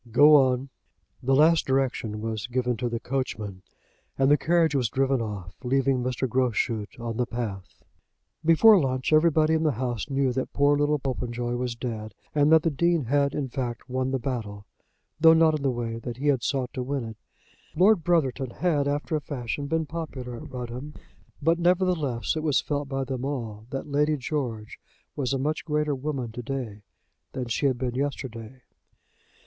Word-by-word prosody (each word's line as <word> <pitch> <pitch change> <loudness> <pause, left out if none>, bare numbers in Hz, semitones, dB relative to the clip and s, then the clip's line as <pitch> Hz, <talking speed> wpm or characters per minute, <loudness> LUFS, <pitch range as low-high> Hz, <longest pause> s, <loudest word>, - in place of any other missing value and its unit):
Go 145 +6 +7
on." 130 -1 +3 0.5
The 135 +1 +2
last 160 +3 +4
direction 130 -5 0
was 110 0 -3
given 125 0 0
to 120 0 -2
the 115 0 -3
coachman, 110 -7 -4 0.6
and 135 +1 +3
the - - +8
carriage 165 0 +2
was 130 -5 +1
driven 135 0 +1
off, 100 -5 -5
leaving 135 0 +1
Mr. 125 +1 -1
Groschut 120 -3 -1
on 115 -1 -4
the 125 -1 0
path. 105 -6 -6 0.6
Before 190 +6 +7
lunch 130 0 0
everybody 155 0 +4
in 160 - +2
the 155 -3 +2
house 120 +2 -3
knew 135 -2 +1
that 130 +1 -3
poor 145 0 +4
little 145 +1 +2
Popenjoy 120 -3 -3
was 125 -1 -2
dead, 110 -4 -5 0.2
and 150 0 +3
that 160 -1 +6
the 165 - +1
Dean 170 +2 +1
had, 140 +3 +1
in 140 - -2
fact, 120 -2 -4
won 130 0 -1
the 135 - 0
battle, 110 -6 -4 0.5
though 160 0 +7
not 160 -1 +5
in 150 - -3
the 140 - +1
way 115 -2 -3
that 120 0 -6
he 145 +3 0
had 135 -4 +2
sought 130 0 -2
to 130 - -3
win 135 +1 -2
it. 110 -1 -8 0.6
Lord 185 +1 +4
Brotherton 140 -7 +1
had, 150 0 0
after 145 +2 -1
a 150 - -1
fashion, 140 0 -4
been 160 +2 0
popular 145 -7 -6
at - - -10
Rudham, 125 +4 -6 0.5
but, 165 +3 +3
nevertheless, 175 -9 +1
it 155 - -2
was 150 -4 +2
felt 145 -1 -3
by 135 -1 -1
them 130 -1 -4
all 115 -6 -4
that 135 0 -4
Lady 150 +1 +1
George 125 -6 -4 0.4
was 130 -4 -1
a 135 - +1
much 150 +4 -1
greater 150 -2 0
woman 135 -3 -3
to 120 - -6
day 120 -5 -5 0.5
than 125 -2 -4
she 140 +5 +1
had 130 -2 0
been 125 -1 -2
yesterday. 130 -3 -5
135 Hz, 185 wpm, -26 LUFS, 120-150 Hz, 0.6 s, the